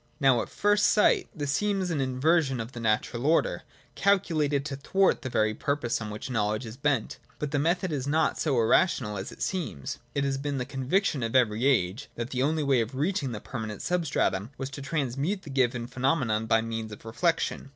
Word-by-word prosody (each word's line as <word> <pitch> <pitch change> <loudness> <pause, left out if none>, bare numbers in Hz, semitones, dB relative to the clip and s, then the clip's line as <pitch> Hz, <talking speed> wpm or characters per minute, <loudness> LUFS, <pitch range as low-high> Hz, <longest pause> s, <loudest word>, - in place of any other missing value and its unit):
Now, 130 -3 +4
at - - -6
first 205 0 +3
sight, 210 - +3
this 145 -2 -2
seems 195 0 0
an 150 -4 0
inversion 135 +1 +2
of 115 +2 -5
the 120 - -8
natural 115 +3 0
order, 165 +1 +2 0.3
calculated 155 -8 +1
to 145 - -3
thwart 190 +8 +2
the 130 - -4
very 110 -2 +1
purpose 125 -2 -1
on 110 - -4
which 105 +5 -6
knowledge 110 0 0
is 110 0 -8
bent. 140 -4 -1 0.2
But 150 -2 -3
the 145 - +1
method 175 +4 +1
is 140 -3 -2
not 155 +2 +1
so 140 -6 +1
irrational 110 - +2
as 95 0 -5
it - - -6
seems. 155 - -3 0.2
It 140 - +1
has 135 -1 -1
been 140 0 -2
the 125 - -2
conviction 140 +4 0
of 115 +2 -2
every 120 0 +3
age 115 -1 +1
that 120 +1 -4
the 125 - -1
only 155 +3 +1
way 135 -4 +3
of 115 +4 -4
reaching 145 -2 0
the 110 - -5
permanent 110 -4 -6
substratum 140 - 0
was 135 +1 -5
to 140 - -7
transmute 145 +6 -2
the 145 - -9
given 125 -3 +1
pheno 130 +5 +1
menon 110 -5 -1
by 110 0 +4
means 115 -1 -4
of 105 - -11
reflection. 150 +5 -1
135 Hz, 205 wpm, -28 LUFS, 115-155 Hz, 0.3 s, Now